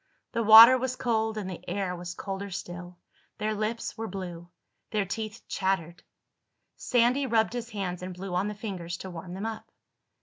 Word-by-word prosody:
The 230 - -1
water 230 +4 +10
was 255 0 -2
cold 220 -3 0
and 205 -3 -3
the 185 -2 -7
air 185 -1 -2
was 175 0 -7
colder 195 +1 -5
still. 175 -1 -7 0.4
Their 215 +1 -1
lips 215 +2 -3
were 225 - -3
blue. 175 -3 -7 0.4
Their 210 -2 0
teeth 215 +3 -5
chattered. 190 -4 -1 0.7
Sandy 250 +3 +2
rubbed 225 -1 +2
his 240 -1 -4
hands 190 -5 -4
and 185 0 -5
blew 185 0 -6
on 185 +3 +1
the 210 - -4
fingers 180 -5 -5
to 190 - -8
warm 175 +1 -7
them 195 +3 -4
up. 225 -1 -5
200 Hz, 175 wpm, -28 LUFS, 180-225 Hz, 0.7 s, water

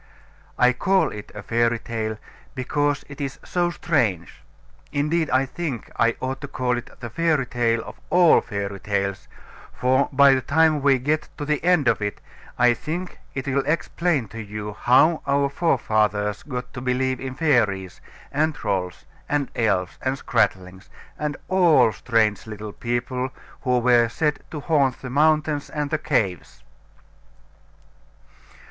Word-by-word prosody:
I 125 0 +5
call 190 +9 +2
it 105 0 -9
a 105 - -7
fairy 115 0 +1
tale, 110 -1 -4 0.4
because 145 +2 -1
it 140 +1 -9
is 135 -1 -4
so 175 -1 0
strange; 115 - -1 0.5
indeed 150 +2 0
I 130 +1 +3
think 135 -3 -5
I 115 0 +2
ought 130 +2 -4
to 140 - -5
call 125 -3 -1
it 120 +1 -6
the 120 -2 -6
fairy 160 -2 +1
tale 115 -1 0
of - - -11
all 175 -2 +6
fairy 100 -1 -4
tales, 100 -1 -2 0.4
for 130 +2 +1
by 140 0 +6
the 130 - +1
time 155 +2 +3
we 135 -1 +4
get 150 +5 -1
to 145 - -4
the 150 0 -1
end 175 -6 +3
of - - +2
it 105 0 -3 0.4
I 120 0 +5
think 175 +8 -5 0.2
it 130 - -3
will 135 0 +1
explain 160 -4 0
to 115 -1 -7
you 105 0 -6
how 140 +9 +4
our 140 0 +2
forefathers 110 -9 0
got 125 -4 -6
to 125 - -6
believe 130 0 0
in 130 -1 -5
fairies, 100 - +1 0.3
and 155 +1 +1
trolls, 95 - -3 0.2
and 145 -2 0
elves, 100 -6 0
and 130 +1 -1
scratlings, 95 -8 -1 0.3
and 150 -1 -2
all 175 -10 +5
strange 110 -1 0
little 105 -1 -7
people 125 +2 -2 0.3
who 125 -1 +1
were 120 -1 +4
said 150 +4 0
to 150 - -6
haunt 140 -5 +1
the 130 - -5
mountains 150 0 +2
and 150 -1 -3
the 155 - 0
caves. 95 - -2
130 Hz, 155 wpm, -23 LUFS, 110-150 Hz, 0.5 s, all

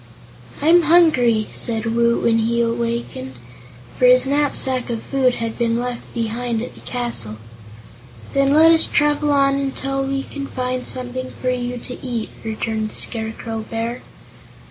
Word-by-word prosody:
"I'm 340 +3 +6
hungry," 290 -10 +4
said 225 -2 -1
Woot, 235 0 +2
when 230 -1 +3
he 235 +1 +1
wakened, 230 - -3 0.6
for 250 - +5
his 255 +1 +6
knapsack 270 -3 0
of 230 -2 -3
food 260 -3 +1
had 230 0 -4
been 230 -1 +1
left 245 0 -5
behind 230 0 -2
at 250 - -7
the - - -15
castle. 235 - -2 1.0
"Then 275 0 +3
let 320 +3 +7
us 325 -1 +5
travel 295 0 +1
on 275 -1 +3
until 270 0 -2
we 270 0 -2
can 280 0 -7
find 255 -1 -3
something 255 0 -3
for 255 - 0
you 245 0 -3
to 250 +1 -8
eat," 240 -4 -3
returned 220 0 -2
the - - -13
Scarecrow 225 0 -2
Bear. 230 +2 -3
245 Hz, 150 wpm, -20 LUFS, 230-275 Hz, 1.0 s, let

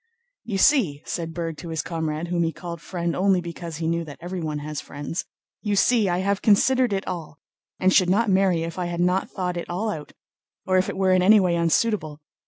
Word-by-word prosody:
"You 205 -4 -3
see," 190 - +3
said 165 -2 -4
Berg 165 -1 -4
to 170 - -8
his 160 0 -2
comrade, 160 0 -3
whom 175 -1 0
he 165 -1 +1
called 170 -1 -8
"friend" 170 -2 -3
only 190 0 +3
because 170 -2 -6
he 165 - -3
knew 170 0 0
that 145 -2 -10
everyone 170 -4 -4
has 150 -1 -4
friends, 145 +4 -5 0.4
"you 205 -2 0
see, 220 -1 +3
I 175 - +1
have 200 +1 0
considered 250 +3 +4
it 195 0 -1
all, 160 -4 -5 0.4
and 185 0 +3
should 185 -2 +4
not 215 +5 +3
marry 190 -4 +3
if 165 +2 -5
I 180 - -1
had 170 0 -4
not 180 +2 +1
thought 180 -2 -3
it 170 - -5
all 205 +5 -1
out 150 -6 -7 0.5
or 185 -1 +3
if 185 - 0
it - - -5
were 190 -1 +2
in 185 0 +4
any 210 +4 +7
way 180 -3 +2
unsuitable. 170 -2 +1
175 Hz, 220 wpm, -24 LUFS, 165-195 Hz, 0.5 s, any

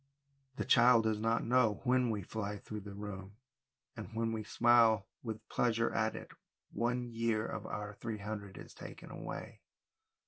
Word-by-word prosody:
The - - -2
child 120 -1 +6
does 110 -1 +1
not 115 +1 +1
know 115 -4 +3
when 125 -1 +3
we 105 -3 -1
fly 105 +1 -4
through 105 +2 -7
the 100 0 -9
room, 100 0 -7 0.6
and 110 -2 -7
when 115 0 0
we 110 -1 -3
smile 115 -2 +5 0.2
with 110 -2 -6
pleasure 115 -1 +1
at 110 0 +1
it, - - -8 0.4
one 120 +3 0
year 115 -1 0
of 110 - -5
our 105 0 -4
three 110 +1 -5
hundred 100 -2 -6
is - - -10
taken - - -10
away. - - -7
110 Hz, 165 wpm, -34 LUFS, 105-115 Hz, 0.6 s, child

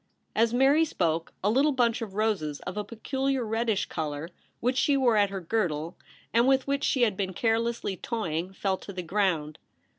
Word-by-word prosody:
As 230 +1 +3
Mary 270 +6 +4
spoke, 165 - -1
a 205 - +3
little 280 +5 +3
bunch 240 -2 +2
of 205 -4 -6
roses 200 -10 0
of 180 - -6
a 210 - -2
peculiar 265 +3 -2
reddish 225 -1 0
colour 150 +1 -4 0.3
which 250 +2 0
she 280 0 +3
wore 250 -4 +3
at 205 -1 +4
her 195 -1 -5
girdle, 170 -4 -1 0.4
and 235 +2 +4
with 265 -1 +3
which 280 0 -1
she 255 - +2
had 215 -5 +2
been 190 -1 -2
care 225 +4 +2
lessly 230 -5 -3
toying, 180 -6 -2
fell 195 0 -1
to 200 - -9
the 180 -1 -4
ground. 170 -5 0
215 Hz, 190 wpm, -28 LUFS, 180-245 Hz, 0.4 s, Mary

